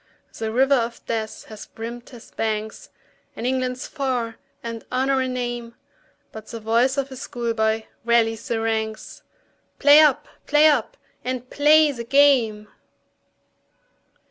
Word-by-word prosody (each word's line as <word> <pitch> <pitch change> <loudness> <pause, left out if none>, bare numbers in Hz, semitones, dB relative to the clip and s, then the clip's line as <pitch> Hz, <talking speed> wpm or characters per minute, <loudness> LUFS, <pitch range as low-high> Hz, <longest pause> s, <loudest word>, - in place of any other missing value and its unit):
The 220 -1 -3
river 265 +4 +3
of 235 -3 -1
death 220 -1 -4
has 215 -1 -10
brimmed 235 +2 -8
his 240 -4 -14
banks, 220 -1 -4 0.5
And 230 - -6
England's 255 0 -1
far, 250 -6 -3 0.3
and 230 -1 -6
Honour 265 +1 +1
a 260 - -1
name, 240 -2 -4 0.6
But 220 0 -10
the 230 - -7
voice 235 +5 +1
of 275 -1 -3
schoolboy 225 -3 -1 0.2
rallies 225 -1 +1
the 230 - -1
ranks, 220 -1 -3 0.6
"Play 290 +1 +7
up! 300 -4 +4 0.2
play 295 +1 +5
up! 300 -2 +2 0.3
and 255 0 -4
play 300 +1 +5
the 235 -4 -6
game!" 235 -5 +3
240 Hz, 130 wpm, -23 LUFS, 225-265 Hz, 0.6 s, Play